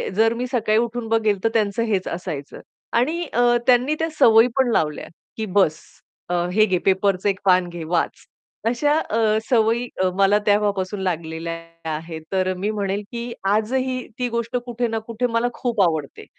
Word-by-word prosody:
जर 225 +2 +3
मी 245 +2 -3
सकाळी 225 -4 +1
उठून 235 0 -2
बघेल 215 -3 +1
तर 225 - +3
त्यांचं 215 0 +1
हेच 200 -4 -1
असायचं 165 -5 -5 0.4
आणि 320 +8 +1
अ, 240 - +2 0.3
त्यांनी 255 +4 +4
त्या 325 0 0
सवयी 225 +1 +7
पण 260 -3 +3
लावल्या, 150 -8 0 0.3
की 220 - -2
बस 185 -6 +2 0.5
अ, - - -1 0.2
हे 215 +3 +4
घे 185 -3 +1
पेपरचे 195 0 +2
1 195 - -2
पान 185 -1 +4
घे 170 -1 -7
वाच. 165 +1 -1 0.4
अशा 270 +6 +2
अ, 220 -5 +1
सवयी 235 0 +2 0.3
मला 200 +1 +4
तेव्हापासून 205 -1 +1
लागलेल्या 165 -2 -3 0.4
आहेत. 160 +1 -7
तर 185 -1 +1
मी 200 +3 -2
म्हणेल, 200 -1 -2
की 235 0 -5 0.2
आजही 255 +4 -1
ती 250 - 0
गोष्ट 235 +1 -2
कुठे 240 0 -2
ना 225 -1 -2
कुठे 230 +2 -1
मला 230 +1 +1
खूप 235 -4 -1
आवडते. 160 -5 -2
215 Hz, 170 wpm, -22 LUFS, 185-235 Hz, 0.5 s, सवयी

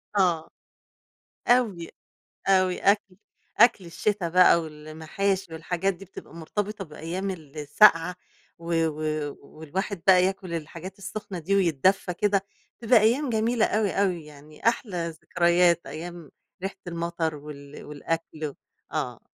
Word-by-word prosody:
آه، 175 -5 +2 1.0
أوي، 220 -9 +2 0.6
أوي. 185 -1 +3
أكل 200 -2 +2 0.4
أكل 230 -5 +5
الشتا 180 +1 -1
بقى 180 -1 +6
والمحاشي 160 +4 -3
والحاجات 180 +4 -1
دي، 195 +3 -12
بتبقى 185 - -12
مرتبطة 200 +4 -4
بأيام 170 +5 -4
السقعة، 165 +3 +3 0.4
و 170 0 -4
و 155 -1 -3
والواحد 165 +6 -5
بقى 185 -1 +7
ياكل 190 -2 -2
الحاجات 170 +4 -6
السخنة 200 -2 -6
دي، 195 +5 0
ويتدفى 180 +1 +2
كده، 200 0 +1 0.3
بتبقى 230 0 +5
أيام 250 +6 +2
جميلة 225 +1 +2
أوي، 210 -2 +1
أوي 180 -5 0
يعني 150 +5 -8
أحلى 185 -8 0
ذكريات، 170 +1 +2
أيام 165 +3 -8 0.3
ريحة 195 +1 -3
المطر 170 -2 -2
وال 145 -1 -10
والأكل، 155 0 -4 0.4
آه - - -3
175 Hz, 120 wpm, -26 LUFS, 160-195 Hz, 1.0 s, بقى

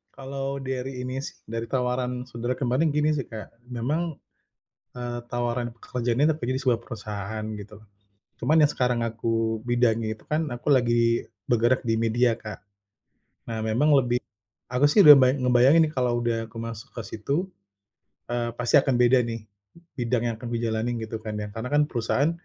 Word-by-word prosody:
Kalau 135 0 -4
dari 130 0 -4
ini 130 +2 -4
sih, - - -8
dari 115 +1 -3
tawaran 125 0 -1
saudara 120 +1 -3
kemarin 135 +5 +1
gini 150 +1 +2
sih, 135 - -2
Kak, 110 -2 -7 0.2
memang, 125 +7 -1 1.0
eee, 120 -1 -4
tawaran 120 0 -1
pekerjaannya 125 +3 0
itu 160 - +4
tapi 150 - -11
di - - -5
sebuah 120 -3 +2
perusahaan 105 -2 -6
gitu. 105 0 -9 0.6
Cuman 150 +7 +2
yang 145 - +3
sekarang 125 -2 0
aku 115 -1 -1
bidangnya 115 -2 +1
itu - - -22
kan 155 +1 -1
aku 120 +4 -6
lagi 120 -2 +2 0.2
bergerak 120 +1 +3
di 115 - +1
media, 115 +2 +2
Kak. 110 -3 -9 0.8
Nah, 115 -1 -3
memang 115 +7 +2
lebih 125 -1 +1 0.5
aku 125 +3 +1
sih 205 - +5
udah 150 -6 +11
ngeba 130 -2 +6
ngebayangin 125 +6 +5
nih - - -9
kalau 125 -1 +1
udah 115 -1 -1
aku 115 - -18
masuk 115 -2 -7
ke 115 - -6
situ, 140 - -2 0.8
eee, 120 0 -2
pasti 120 +3 +2
akan 135 -2 +4
beda 125 +1 +6
nih 115 -1 -4 0.6
bidang 120 -1 0
yang 115 - -2
akan 120 +2 -7
dijalani 115 0 -1
gitu 110 +1 -5
kan 110 -1 -4
ya. 105 - -4
Karena 115 +2 -4
kan 145 0 +5
perusahaan 130 +5 +1
120 Hz, 170 wpm, -25 LUFS, 115-130 Hz, 1.0 s, udah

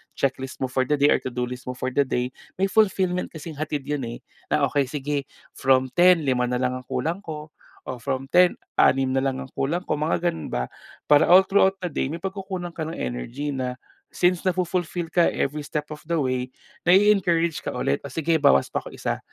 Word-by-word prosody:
checklist 130 -1 -2
mo 130 - -2
for 130 -1 +1
the 150 - +2
day 145 0 +4
or - - +3
to-do 125 -1 -3
list 125 +1 -6
mo 125 - -3
for 130 +1 -3
the 140 +1 +2
day 125 0 -1 0.2
may 195 +1 +1
fulfillment 190 -4 +2
kasing 160 0 -7
hatid 150 -2 -2
'yun 145 0 -3
eh, 115 - -7 0.3
na 150 0 +1
okey 140 -2 +1
sige 145 0 -3 0.2
from 130 -1 +2
10 175 +2 +5
5 125 -3 +1
nalang 125 +1 -1
ang 125 - -16
kulang 160 +10 -2
ko 155 -5 -8 0.3
o 125 - -5
from 135 +2 -2
10 180 0 +5 0.3
6 135 -1 +4
na 135 - +2
lang 135 -1 -1
ang 135 - -13
kulang 165 +7 -1
ko - - 0
mga 165 +3 +1
ganun 165 - -7
ba, 60 0 -1 0.4
para 145 -1 +6
all 185 +2 +8
throughout 195 -1 +4
the 175 - -2
day 140 - -1
may 160 - -4
pagkukunan 190 -1 -5
ka 165 - -7
ng 165 - -5
energy 115 - -4
na 130 -1 -3 0.4
since 175 -1 +2
nafu-fulfill 180 -1 -1
ka 175 -1 +4
every 150 +2 -1
step 150 +1 -3
of 150 - -10
the 170 - +1
way, 130 -3 0 0.4
nai-encourage 175 -5 +4
ka - - -4
ulit 70 - 0
o - - -3
sige 165 +3 +1
bawas 140 - +4
pa - - +1
ko - - -10
1 - - -3
145 Hz, 210 wpm, -24 LUFS, 130-175 Hz, 0.4 s, all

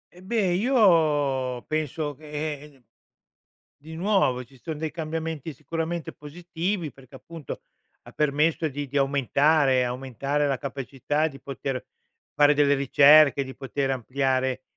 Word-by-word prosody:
Eh, 180 - -15
beh, 200 -1 0
io 155 - +2
penso 155 -1 -2
che 150 0 -6
uhm, 135 -3 -25 0.9
di 160 +3 -11
nuovo, 170 -9 +1
ci 130 +3 -20
son 155 +2 -6
dei 160 -1 -3
cambiamenti 160 -1 -4
sicuramente 165 +3 -4
positivi 170 +2 -4
perché, 135 0 -15
appunto, 160 -1 -9 0.4
ha - - -13
permesso 150 +2 +1
di 145 +1 -5
di 145 - -5
aumentare 140 0 +3
aumentare 135 +3 -2
la 135 -2 0
capacità 140 +3 -2
di 135 - -12
poter 135 -1 -4 0.5
fare 145 0 +5
delle 145 -1 +3
ricerche, 140 +1 +6
di 130 0 -9
poter 135 +1 -3
ampliare 130 0 -1
145 Hz, 130 wpm, -25 LUFS, 135-160 Hz, 0.9 s, ricerche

